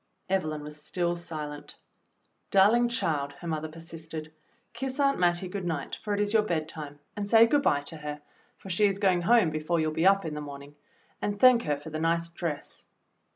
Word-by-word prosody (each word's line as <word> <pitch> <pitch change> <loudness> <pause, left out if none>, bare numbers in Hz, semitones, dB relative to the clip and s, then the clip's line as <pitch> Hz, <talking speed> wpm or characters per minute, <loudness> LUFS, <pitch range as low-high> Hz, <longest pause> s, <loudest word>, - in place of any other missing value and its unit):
Evelyn 155 -6 -1
was 150 0 -9
still 175 +1 -1
silent. 155 -4 -7 0.7
"Darling 225 +5 +5
child," 150 -11 -1
her 170 - -9
mother 155 -1 -2
persisted, 160 -1 -9 0.4
"kiss 265 +1 -4
Aunt 275 -1 +3
Mattie 175 +1 +2
good 190 +1 -5
night, 160 -5 -3
for 210 - -4
it - - -2
is 205 +1 0
your 220 - +5
bedtime, 155 -6 -4 0.2
and 205 -1 -4
say 225 +1 +8
good 285 +5 +2
bye 145 - +2
to 160 +3 -8
her, 150 -1 -6 0.4
for 195 - -8
she 205 +4 +4
is 195 -1 -1
going 190 -3 +2
home 215 -3 +4
before 155 +2 -1
you'll 155 0 +1
be 165 +4 +2
up 195 -2 +4
in 160 - -3
the 150 - -4
morning; 140 0 -9 0.5
and 205 0 -2
thank 250 -1 +7
her 145 -1 0
for 145 +2 -10
the 155 - -3
nice 165 +1 +1
dress." 165 -3 -6
170 Hz, 200 wpm, -28 LUFS, 155-200 Hz, 0.7 s, say